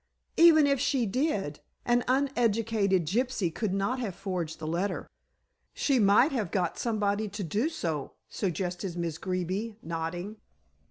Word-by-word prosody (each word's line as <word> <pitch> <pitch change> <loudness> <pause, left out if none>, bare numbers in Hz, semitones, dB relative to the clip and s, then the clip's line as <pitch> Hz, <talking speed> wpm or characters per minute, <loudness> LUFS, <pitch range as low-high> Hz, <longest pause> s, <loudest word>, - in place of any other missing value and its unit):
"Even 325 -3 +7
if 280 -2 +2
she 260 -2 +1
did, 205 - -1 0.3
an 240 0 +3
uneducated 230 - +1
gypsy 215 -2 0
could 215 0 -2
not 200 +7 0
have 210 -8 -3
forged 180 -5 -4
the 160 - -7
letter." 175 +6 -2 0.7
"She 275 -3 +2
might 210 +7 +5
have 225 -9 -1
got 180 -2 -1
somebody 210 -2 0
to 205 +1 -5
do 210 - 0
so," 160 - -3
suggested 180 -1 -3
Miss 165 -2 -3
Greeby, 185 +4 -3
nodding. 170 +5 -4
200 Hz, 140 wpm, -29 LUFS, 175-240 Hz, 0.7 s, Even